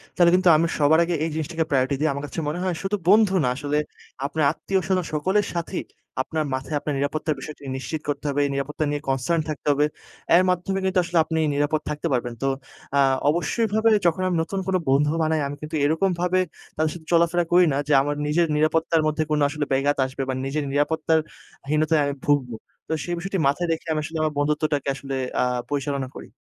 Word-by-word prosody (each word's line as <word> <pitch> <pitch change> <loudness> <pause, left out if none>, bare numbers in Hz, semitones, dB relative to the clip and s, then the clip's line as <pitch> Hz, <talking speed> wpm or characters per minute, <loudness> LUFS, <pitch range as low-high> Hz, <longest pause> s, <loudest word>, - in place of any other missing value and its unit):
তাহলে 175 -2 +5
কিন্তু 185 -1 +4
আমি 165 +2 +2
সবার 155 +2 +5
আগে 170 0 -1
এই 165 - 0
জিনিসটাকে 160 +1 -2
priority 135 0 +2
দিই। 155 - +2
আমার 140 +1 -5
কাছে 145 - -6
মনে 155 +4 -2
হয় 185 -2 -1
শুধু 195 +2 0
বন্ধু 205 0 +5
না 125 - +2
আসলে, 145 +2 -2 0.5
আপনার 150 +2 -1
আত্মীয় 190 +4 -1
স্বজন 185 -2 +1
সকলের 190 +7 +1
সাথেই 170 +2 -3 0.4
আপনার 155 +4 -2
মাথায় 130 +3 -3
আপনার 145 0 -3
নিরাপত্তার 155 +2 -1
বিষয়টি 145 +2 -9
নিশ্চিত 150 +3 -4
করতে 145 0 -3
হবে। 140 0 -1
এই 140 - -1
নিরাপত্তা 140 +3 -2
নিয়ে 145 0 -2
concern 135 +6 +1
থাকতে 150 0 -5
হবে। 145 +1 +3 0.5
এর 180 - +6
মাধ্যমে 180 +2 0
কিন্তু 190 -1 +2
আসলে 175 0 -2
আপনি 160 0 -1 0.2
নিরাপদ 145 +2 +1
থাকতে 150 +2 -2
পারবেন। 120 -1 -1
তো 135 - +2 0.5
আ - - +4 0.3
অবশ্যইভাবে 220 +7 +1 0.2
যখন 170 +2 +2
আমি 180 - 0
নতুন 195 +4 -4
কোন 190 - +1
বন্ধু 140 +2 +3
বানাই। 155 0 +1
আমি 145 - -5
কিন্তু 155 +1 -5
এরকমভাবে 180 +3 +1 0.4
তাদের 155 0 0
সাথে 160 -2 -12
চলাফেরা 170 +1 +3
করি 180 +1 +6
না, - - 0
যে, - - -1
আমার 145 +1 -1
নিজের 165 +3 +2
নিরাপত্তার 160 +1 +2
মধ্যে 155 +1 0
কোনো 150 -1 +2
আসলে 150 0 -2
বেঘাত 140 +2 +1
আসবে 130 +1 -5
বা - - 0
নিজের 145 +2 -2
নিরাপত্তার 160 +2 +2 0.5
হীনতায় 155 -1 +2
ভুগব। 140 -4 +2 0.4
তো - - 0
সেই 175 - -3
বিষয়টি 195 +2 -3
মাথায় 175 +5 0
রেখে 165 0 -3
আমি 155 - 0
আসলে 160 +1 -5
আমার 155 -1 0
বন্ধুত্বটাকে 150 0 0
আসলে 135 0 -5 0.3
আ - - +3 0.3
পরিচালনা 140 -2 -2
করি। - - -9
155 Hz, 200 wpm, -24 LUFS, 145-170 Hz, 0.5 s, এর